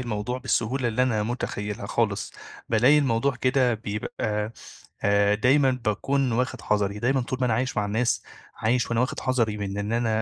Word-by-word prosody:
الموضوع 120 +1 -3
بالسهولة 125 0 0
اللي 115 +3 +1
أنا 115 -5 +1
مُتخيّلها 105 -3 -4
خالِص. 105 -2 -1 0.4
بالاقي 125 +7 +5
الموضوع 135 0 +1
كده 130 -2 +2
بيبقى 105 0 -3 0.5
آآ 100 0 +4
دايمًا 135 +4 +4
باكون 130 +4 0
واخد 125 +1 -1
حَذَري، 105 -1 0
دايمًا 130 +4 +1
طول 130 +1 -3
ما 125 - +2
أنا 115 - +2
عايش 130 +1 -1
مع 105 - +1
الناس، 110 +4 0 0.3
عايش 120 +2 0
وأنا 115 - +1
واخِد 125 - -1
حَذَري 115 -5 0
مِن 100 -1 -4
إن 105 +2 -2
أنا 120 -1 +1
115 Hz, 170 wpm, -25 LUFS, 105-125 Hz, 0.5 s, بالاقي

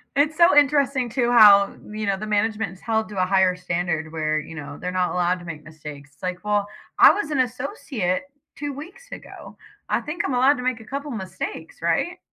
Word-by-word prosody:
It's 295 +2 +2
so 340 -2 +6
interesting, 280 -3 +3
too, 240 0 0
how, 200 -3 +7 0.2
you 215 0 -5
know, 195 -1 0
the 215 - -5
management 215 0 0
is 185 - -15
held 220 -1 -1
to 200 -3 -2
a - - +4
higher 190 -1 +2
standard 170 -3 -3
where, 155 -1 -1
you 155 +2 -8
know, 145 -2 -8
they're 180 0 -4
not 185 -1 0
allowed 180 0 0
to 175 - -12
make 155 -2 -8
mistakes. 150 -2 -11
It's - - -31
like, 180 0 -4
"Well, 205 -1 0 0.3
I - - +9
was 320 -7 -3
an 290 - -1
associate 250 - -2 0.3
2 290 -1 -5
weeks 375 - -11
ago. - - -11 0.3
I - - +1
think 300 +3 -3
I'm 260 - -1
allowed 265 +3 +4
to 250 - -5
make 255 -2 -1
a 225 - -12
couple 280 +4 -5
mistakes, 185 -5 -7
right?" 170 - 0
210 Hz, 215 wpm, -23 LUFS, 180-265 Hz, 0.3 s, I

